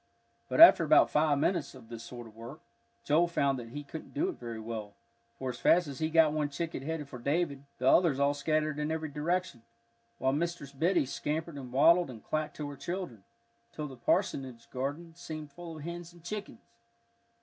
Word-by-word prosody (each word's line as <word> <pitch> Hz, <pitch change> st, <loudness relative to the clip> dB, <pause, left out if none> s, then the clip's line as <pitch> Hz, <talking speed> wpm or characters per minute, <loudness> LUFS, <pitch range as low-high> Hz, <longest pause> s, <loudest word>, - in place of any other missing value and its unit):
But -, -, -1 dB
after 330 Hz, -, +10 dB
about 155 Hz, -, +5 dB
five 150 Hz, -1 st, +3 dB
minutes 150 Hz, -1 st, 0 dB
of 120 Hz, -3 st, -14 dB
this 115 Hz, -1 st, -7 dB
sort 120 Hz, 0 st, -9 dB
of 110 Hz, -1 st, -14 dB
work, 115 Hz, -6 st, -10 dB, 0.4 s
Joel 165 Hz, +4 st, +3 dB
found 140 Hz, -5 st, +1 dB
that 115 Hz, -1 st, -8 dB
he 145 Hz, +5 st, -6 dB
couldn't 155 Hz, -, -9 dB
do 330 Hz, +6 st, +1 dB
it 370 Hz, -, -7 dB
very 115 Hz, -1 st, -6 dB
well, 110 Hz, -2 st, -6 dB, 0.4 s
for 130 Hz, -1 st, -3 dB
as -, -, -10 dB
fast 175 Hz, +1 st, +4 dB
as 140 Hz, -2 st, -7 dB
he 155 Hz, -, 0 dB
got 160 Hz, -2 st, +5 dB
one 150 Hz, -1 st, 0 dB
chicken 160 Hz, 0 st, -4 dB
headed 150 Hz, 0 st, -4 dB
for 125 Hz, -3 st, -9 dB
David, 140 Hz, +1 st, -1 dB
the 130 Hz, -, -1 dB
others 150 Hz, -2 st, +5 dB
all 140 Hz, +1 st, +3 dB
scattered 155 Hz, +1 st, 0 dB
in 150 Hz, 0 st, -1 dB
every 160 Hz, -1 st, -2 dB
direction, 155 Hz, -2 st, -2 dB, 0.6 s
while 130 Hz, +1 st, +1 dB
Mistress 165 Hz, -2 st, -2 dB
Biddy 160 Hz, +3 st, +2 dB
scampered 155 Hz, +5 st, -3 dB
and 130 Hz, -3 st, -8 dB
waddled 170 Hz, +5 st, +5 dB
and 115 Hz, -4 st, -10 dB
clacked 155 Hz, -1 st, -2 dB
to 150 Hz, -, -4 dB
her -, -, -8 dB
children, 175 Hz, -, -5 dB, 0.5 s
till 150 Hz, -1 st, -4 dB
the 135 Hz, -, -10 dB
parsonage 125 Hz, 0 st, -1 dB
garden 145 Hz, +6 st, -4 dB
seemed 155 Hz, -3 st, -8 dB
full 165 Hz, +1 st, -9 dB
of 150 Hz, -, -9 dB
hens 170 Hz, +1 st, -7 dB
and 170 Hz, -1 st, -18 dB
chickens. 200 Hz, -, -6 dB
150 Hz, 200 wpm, -31 LUFS, 130-165 Hz, 0.6 s, after